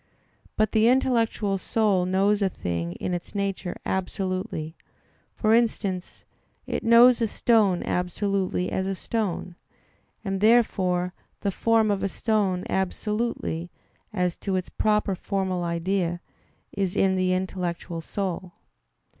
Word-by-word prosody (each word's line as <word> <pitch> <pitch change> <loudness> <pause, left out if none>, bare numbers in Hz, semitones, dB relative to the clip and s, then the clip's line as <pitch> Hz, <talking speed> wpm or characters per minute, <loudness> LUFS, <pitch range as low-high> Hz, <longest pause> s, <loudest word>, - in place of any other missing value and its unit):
But 215 -1 +2
the 220 +1 +4
intellectual 230 -6 +2
soul 200 -4 +1
knows 200 +3 +2
a 195 - +3
thing 85 - -3
in 180 - -4
its 175 +3 -5
nature 195 -2 -2
absolutely: 185 -3 -3 0.6
for 215 0 +2
instance, 210 -6 0 0.4
it - - -3
knows 235 +1 +7
a 225 - +3
stone 210 -5 +2
absolutely 185 0 -1
as 190 0 -1
a 195 - -1
stone; 190 -4 -3 0.7
and 195 -1 -2
therefore 185 -6 +3 0.3
the 200 - 0
form 225 +1 +2
of 200 - -1
a 195 - 0
stone 200 -4 0
absolutely, 190 -3 -2 0.4
as 180 -4 -1
to 195 -2 -2
its 185 -1 -2
proper 210 -2 +1
formal 190 -1 -2
idea, 175 +1 -1 0.5
is 190 -2 -1
in 190 -1 +3
the 185 0 +1
intellectual 180 -2 -3
soul. 185 0 -4
195 Hz, 125 wpm, -25 LUFS, 180-215 Hz, 0.7 s, knows